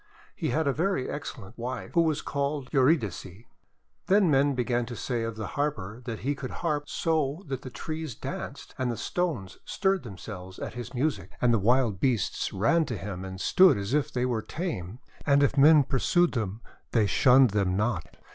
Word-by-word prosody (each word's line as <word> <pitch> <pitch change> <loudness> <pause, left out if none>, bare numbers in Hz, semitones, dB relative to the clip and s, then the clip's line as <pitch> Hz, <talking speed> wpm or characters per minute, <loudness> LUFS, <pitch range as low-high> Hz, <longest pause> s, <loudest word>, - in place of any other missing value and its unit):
He - - -2
had 155 +4 0
a 140 - +2
very 175 -3 0
excellent 120 -8 -7
wife, 125 0 -5
who 170 - +5
was 155 -2 0
called 140 -2 -2
Eurydice. 130 - +2 0.8
Then 195 -3 +4
men 140 0 +3
began 120 -1 0
to 120 - -6
say 120 0 -2
of 115 -1 -3
the 110 -1 -5
Harper 120 -7 -2
that 115 -4 -5
he 140 +4 0
could 135 -2 -6 0.2
harp 145 -2 -1
so 160 +1 0
that 135 -3 -4
the 130 - -7
trees 155 -1 -5
danced, - - -7
and 130 -1 0
the 115 - -4
stones 150 - -2
stirred 195 -1 0
themselves 95 -4 -9
at - - -5
his 120 +2 -7
music. 145 +5 -1
And 120 -1 +3
the 115 - +3
wild 115 -1 +2
beasts 120 -5 0
ran 160 - +2
to 120 -7 -4
him 95 -2 -6
and 95 0 -7
stood 185 - +5
as 100 +4 -3
if 150 -1 +1
they 125 0 0
were 120 -3 0
tame; 120 - -5 0.3
and 140 -1 +4
if 140 - +2
men 150 +1 +7
pursued 175 +7 +2
them, 110 -3 -3 0.3
they 110 -3 +4
shunned 125 +5 +5
them 95 -2 +1
not. 105 -5 -2
130 Hz, 190 wpm, -27 LUFS, 110-150 Hz, 0.8 s, men